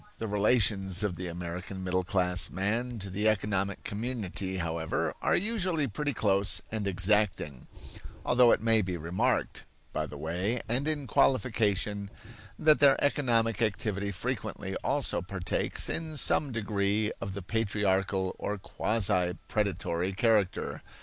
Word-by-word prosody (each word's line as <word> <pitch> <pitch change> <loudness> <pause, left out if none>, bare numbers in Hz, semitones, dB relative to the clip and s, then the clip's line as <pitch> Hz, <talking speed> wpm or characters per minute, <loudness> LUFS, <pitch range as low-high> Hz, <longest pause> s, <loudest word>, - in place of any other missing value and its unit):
The 110 - -4
relations 100 -3 +2
of 100 -4 -1
the 90 +1 -5
American 90 +2 -6
middle 90 0 0
class 90 -1 +1
man 115 +6 -2
to 100 -2 -6
the 105 +3 +1
economic 100 -2 -1
community, 100 -4 -3
however, 80 -2 -2
are - - +2
usually 185 -7 0
pretty 145 +5 -2
close 100 -4 +2
and 110 -2 -2
exacting; 95 -8 +1 0.6
although 125 -1 +5
it - - +2
may 115 -1 +4
be 90 -2 -3
remarked, 85 +3 -1 0.3
by - - -2
the 75 - -9
way 90 +10 -1
and 125 +6 0
in 150 -3 -1
qualification, 105 -7 +1 0.5
that 155 -1 +4
their 140 -1 +6
economic 115 -7 +1
activity 100 -2 -1
frequently 90 - -4
also - - 0
partakes 90 0 -1
in 160 -2 -4
some 145 0 +4
degree 105 -1 0
of 95 -1 -4
the 100 - -6
patriarchal 100 -3 0
or 105 - -2
quasi 95 -3 0
predatory 95 -3 -1
character. 105 -1 +1
100 Hz, 135 wpm, -29 LUFS, 95-115 Hz, 0.6 s, their